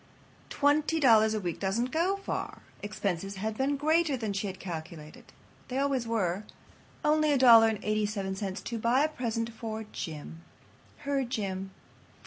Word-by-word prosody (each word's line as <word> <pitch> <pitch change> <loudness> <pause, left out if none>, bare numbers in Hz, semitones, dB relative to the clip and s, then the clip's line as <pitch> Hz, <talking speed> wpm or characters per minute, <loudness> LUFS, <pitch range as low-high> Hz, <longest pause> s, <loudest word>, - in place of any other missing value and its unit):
Twenty 295 +3 +2
dollars 220 -5 +5
a - - 0
week 175 -4 -4
doesn't 225 +6 -1
go 350 +5 +1
far. 395 - -5 0.2
Expenses 195 -2 -3
had 215 +3 -3
been 275 +4 0
greater 310 0 +2
than 220 -4 -3
she 200 +1 -2
had 190 -1 -7
calculated. 160 -3 -8 0.4
They 255 - -4
always 270 -4 0
are. 200 -4 0 0.6
Only 305 0 +3
$1.87 215 -5 +3
to 235 - -4
buy 240 +5 +3
a - - +3
present 230 -5 -3
for 220 -1 -5
Jim. 160 0 -7 0.6
Her 280 -1 +1
Jim. 195 -6 -3
220 Hz, 135 wpm, -29 LUFS, 195-270 Hz, 0.6 s, dollars